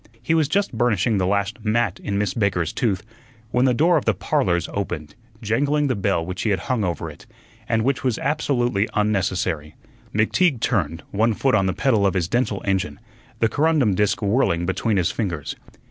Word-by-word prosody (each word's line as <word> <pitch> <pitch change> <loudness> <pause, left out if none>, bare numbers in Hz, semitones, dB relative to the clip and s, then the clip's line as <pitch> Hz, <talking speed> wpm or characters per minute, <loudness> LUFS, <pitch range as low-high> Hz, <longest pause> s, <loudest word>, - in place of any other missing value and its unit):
He 120 +7 -1
was 160 -3 +3
just 200 -1 0
burnishing 110 -2 +1
the 90 - +1
last 100 +3 -1
"mat" 110 -3 0
in 100 -1 -2
Miss 105 -2 0
Baker's 95 -7 0
tooth, 105 -4 0 0.5
when 125 +2 +3
the 130 - +4
door 165 +5 +4
of 150 - -2
the 115 - +2
"Parlors" 85 0 0
opened, 90 -7 -4 0.3
jangling 145 +7 +1
the 130 - +1
bell 95 -4 0
which 90 +1 -5
he 110 - 0
had 95 -3 0
hung 125 -2 -1
over 85 -2 -2
it, 75 - -12 0.4
and 115 -1 +2
which 135 +2 0
was 125 -4 +1
absolutely 120 -7 0
unnecessary. 95 -7 0 0.4
McTeague 125 - +2
turned, 85 -7 -1
one 110 +2 +2
foot 135 +4 +1
on 95 -3 +3
the - - +2
pedal 110 -2 +2
of 95 - -1
his 85 -3 0
dental 120 -2 -1
engine, 95 -7 -1 0.4
the 115 - +5
corundum 145 -5 +2
disk 105 +2 +1
whirling 100 -5 +1
between 100 +3 0
his 90 -3 +1
fingers. 85 -10 -3
105 Hz, 190 wpm, -22 LUFS, 95-120 Hz, 0.5 s, the